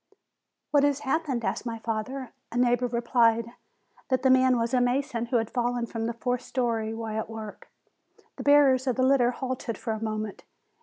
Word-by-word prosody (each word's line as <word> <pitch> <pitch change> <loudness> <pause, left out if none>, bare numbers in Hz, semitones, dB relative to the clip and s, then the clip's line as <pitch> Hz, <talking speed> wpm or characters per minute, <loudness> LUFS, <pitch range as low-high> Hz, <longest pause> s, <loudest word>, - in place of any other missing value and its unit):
"What 290 - +5
has 285 -1 +2
happened?" 270 -4 -1
asked - - -2
my 230 -2 -4
father. 225 +3 -4 0.2
A 240 - -4
neighbor 245 0 +2
replied, 235 -1 +2 0.6
that 260 -1 +1
the 260 - +5
man 260 -1 +5
was 230 +2 -1
a 250 - +4
mason 245 -1 0
who 245 - -2
had 225 -1 -2
fallen 245 -1 0
from 225 -1 -4
the 235 - -2
fourth 245 +1 -2
story 230 -4 -1
while 225 -1 -4
at 220 - -5
work. 220 -2 -8 0.7
The - - -5
bearers 275 -2 +5
of 255 - +1
the 255 - +1
litter 260 -2 +4
halted 250 -2 -4
for 225 - -3
a 220 0 -5
moment. 215 -2 -4
240 Hz, 190 wpm, -27 LUFS, 225-260 Hz, 0.7 s, What